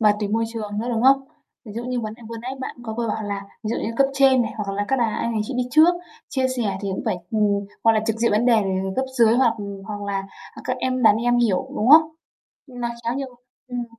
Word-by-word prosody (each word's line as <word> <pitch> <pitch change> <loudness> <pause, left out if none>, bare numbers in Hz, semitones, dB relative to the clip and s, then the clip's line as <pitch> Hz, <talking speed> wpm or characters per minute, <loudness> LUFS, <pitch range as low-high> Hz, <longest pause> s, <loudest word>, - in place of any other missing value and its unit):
và 210 -2 +5
tùy 205 - -1
môi 225 +2 +1
trường 210 -2 -4
nữa, 230 +3 -2
đúng 225 -1 0
không? 270 +1 +5 0.4
Ví 215 - -9
dụ 235 +3 -5
như 250 0 -2
vấn 215 -1 -5
đề 235 - -17
vừa 230 - -6
nãy 250 - -4
bạn 260 - -5
có 220 -2 -5
vừa 235 -1 -1
bảo 220 +1 -2
là 200 -1 -4 0.2
ví - - -2
dụ 235 - -1
như - - -2
cấp 275 - +5
trên 270 -2 +5
này 220 - -4
hoặc 205 -2 -3
là 205 +1 -1
các 270 - +2
bà, 240 - +3
anh 230 +1 -1
đàn 220 - -1
chị 265 - -5
đi 250 - +1
trước, 320 +5 +6 0.3
chia 260 -1 0
sẻ 205 -6 -1
thì 200 - -3
cũng - - -4
phải - - 0
ừm, 205 -2 +1 0.2
hoặc 225 - +6
là 220 - +2
trực 225 -1 0
diện 230 0 +1
vấn 215 +4 +2
đề, 245 - +6
ừm, 190 0 -2
cấp 260 - +1
dưới 230 -1 +6
hoặc 245 -3 +3 0.3
hoặc 205 -1 -5
là, 200 -1 -2 0.3
à, - - -11
các - - -1
em, 255 -1 -1
đàn 215 -2 +6
em 240 +2 +1
hiểu, 225 -6 +1
đúng 220 - +1
không? 315 +2 +10 0.6
Nó 245 -3 -4 0.2
khá 235 +1 0
nhiều 275 0 -3 0.4
ừm, 245 -1 -3
230 Hz, 275 wpm, -22 LUFS, 210-250 Hz, 0.6 s, không